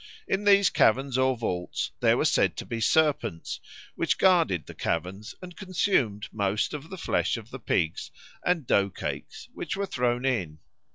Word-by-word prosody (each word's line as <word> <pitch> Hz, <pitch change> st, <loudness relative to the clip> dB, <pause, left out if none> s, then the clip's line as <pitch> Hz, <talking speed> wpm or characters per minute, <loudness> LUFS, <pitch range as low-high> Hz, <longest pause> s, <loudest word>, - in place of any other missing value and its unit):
In 200 Hz, +2 st, -1 dB
these 200 Hz, -4 st, +5 dB
caverns 135 Hz, +3 st, +3 dB
or 130 Hz, 0 st, +2 dB
vaults 90 Hz, -6 st, -3 dB
there -, -, +4 dB
were -, -, +1 dB
said -, -, +2 dB
to -, -, -5 dB
be 115 Hz, -1 st, -4 dB
serpents, 145 Hz, -, +1 dB, 0.3 s
which -, -, 0 dB
guarded 165 Hz, -, +3 dB
the -, -, -10 dB
caverns 95 Hz, +6 st, -3 dB
and 180 Hz, -1 st, -9 dB
consumed 170 Hz, -, 0 dB
most 100 Hz, +3 st, -1 dB
of 150 Hz, +2 st, -7 dB
the 190 Hz, -, -7 dB
flesh 165 Hz, -, 0 dB
of 115 Hz, +1 st, -11 dB
the 135 Hz, -, -7 dB
pigs 80 Hz, -8 st, -1 dB, 0.3 s
and 175 Hz, -5 st, +1 dB
dough 100 Hz, -3 st, +3 dB
cakes 95 Hz, -, -6 dB
which -, -, -4 dB
were 200 Hz, -, -1 dB
thrown 125 Hz, -7 st, -1 dB
in. 95 Hz, -13 st, -1 dB
125 Hz, 170 wpm, -27 LUFS, 100-170 Hz, 0.3 s, these